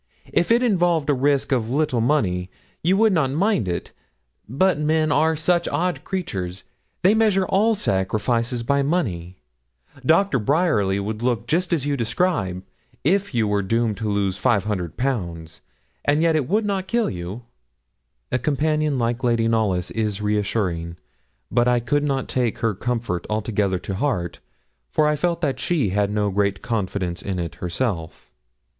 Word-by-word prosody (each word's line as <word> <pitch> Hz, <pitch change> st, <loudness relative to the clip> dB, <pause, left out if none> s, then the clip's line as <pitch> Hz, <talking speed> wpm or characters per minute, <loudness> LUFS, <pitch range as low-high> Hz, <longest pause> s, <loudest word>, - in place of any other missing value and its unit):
If 170 Hz, -, +2 dB
it 235 Hz, +2 st, +4 dB
involved 175 Hz, -, +2 dB
a -, -, +3 dB
risk 140 Hz, +1 st, +1 dB
of 120 Hz, -4 st, +1 dB
a 130 Hz, -, -1 dB
little 145 Hz, -6 st, +1 dB
money, 95 Hz, -9 st, +1 dB, 0.3 s
you 185 Hz, +4 st, +2 dB
would 220 Hz, -1 st, +4 dB
not 155 Hz, -7 st, +2 dB
mind 160 Hz, -, +1 dB
it; 85 Hz, -1 st, -3 dB, 0.6 s
but 155 Hz, -, +2 dB
men 155 Hz, 0 st, +1 dB
are 160 Hz, +3 st, +3 dB
such 170 Hz, +3 st, +1 dB
odd 180 Hz, +1 st, -1 dB
creatures 95 Hz, -, -4 dB, 0.4 s
they 190 Hz, +3 st, +6 dB
measure 215 Hz, -4 st, +3 dB
all 220 Hz, +5 st, +2 dB
sacrifices 115 Hz, -, 0 dB
by 140 Hz, +4 st, +2 dB
money. 95 Hz, -, -1 dB, 0.7 s
Doctor 165 Hz, +1 st, +3 dB
Bryerly 110 Hz, -, +2 dB
would 105 Hz, +2 st, -4 dB
look 120 Hz, -2 st, 0 dB
just 175 Hz, +7 st, 0 dB
as 155 Hz, -5 st, +1 dB
you 145 Hz, -1 st, 0 dB
describe, 110 Hz, -, -1 dB, 0.4 s
if 195 Hz, 0 st, +1 dB
you 110 Hz, -2 st, +2 dB
were 105 Hz, 0 st, +1 dB
doomed 115 Hz, +2 st, 0 dB
to 110 Hz, -1 st, -2 dB
lose 100 Hz, -1 st, -1 dB
500_l_., 95 Hz, -, -1 dB, 0.5 s
and 145 Hz, +2 st, +3 dB
yet 165 Hz, -1 st, +3 dB
it 145 Hz, -5 st, 0 dB
would 210 Hz, +2 st, +2 dB
not 195 Hz, -2 st, -1 dB
kill 235 Hz, -1 st, +1 dB
you.' 90 Hz, +6 st, -6 dB, 0.9 s
A 130 Hz, -, +1 dB
companion 150 Hz, +1 st, 0 dB
like 120 Hz, +1 st, -1 dB
Lady 115 Hz, -2 st, +2 dB
Knollys 105 Hz, -6 st, 0 dB
is 105 Hz, -2 st, -1 dB
reassuring; 100 Hz, -5 st, -1 dB, 0.5 s
but 120 Hz, +1 st, +3 dB
I 125 Hz, 0 st, +3 dB
could 145 Hz, +5 st, 0 dB
not 135 Hz, -3 st, -1 dB
take 125 Hz, -3 st, 0 dB
her 115 Hz, -1 st, 0 dB
comfort 115 Hz, -4 st, -3 dB
altogether 105 Hz, -3 st, 0 dB
to 95 Hz, -, -5 dB
heart, 95 Hz, -, -2 dB, 0.5 s
for 150 Hz, -, +2 dB
I 150 Hz, -, +2 dB
felt 170 Hz, +2 st, -1 dB
that 135 Hz, -5 st, -1 dB
she 150 Hz, -, 0 dB
had 100 Hz, +1 st, +1 dB
no 105 Hz, -1 st, 0 dB
great 100 Hz, 0 st, 0 dB
confidence 95 Hz, -5 st, -2 dB
in 95 Hz, -2 st, -3 dB
it 85 Hz, -3 st, -3 dB
herself. 90 Hz, -2 st, -3 dB
120 Hz, 160 wpm, -22 LUFS, 100-155 Hz, 0.9 s, they